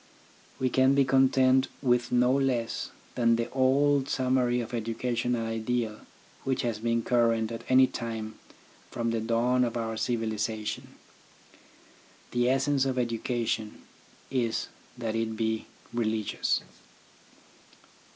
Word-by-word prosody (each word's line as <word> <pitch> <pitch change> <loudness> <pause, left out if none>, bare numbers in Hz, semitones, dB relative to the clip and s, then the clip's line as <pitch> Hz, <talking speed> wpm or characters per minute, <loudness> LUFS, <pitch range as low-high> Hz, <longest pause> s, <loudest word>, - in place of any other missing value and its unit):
We 130 -1 0
can 130 +1 +4
be 140 -1 +4
content 130 0 +4
with 125 -3 +1
no 125 0 +4
less 130 -4 0 0.2
than 115 -1 +3
the 115 +1 -2
old 135 +1 +3
summary 125 -2 +1
of 120 0 -5
educational 120 +1 -1
ideal 115 0 -2 0.4
which 130 -1 -1
has 115 -3 -2
been 115 0 0
current 115 -2 +2
at 115 0 -6
any 130 0 +7
time 115 -3 -5 0.5
from 115 -1 -2
the 115 -1 -1
dawn 120 +3 +2
of 120 -1 -1
our 115 -1 -3
civilisa 110 -2 -2
tion. - - -5 1.4
The 120 0 +2
essence 135 +1 +2
of 130 -1 -1
education 115 -2 -2 0.5
is 120 -4 -1 0.3
that 115 -2 -3
it 110 -1 -2
be 110 0 -1 0.3
religious. 110 -3 0
120 Hz, 120 wpm, -28 LUFS, 115-130 Hz, 1.4 s, any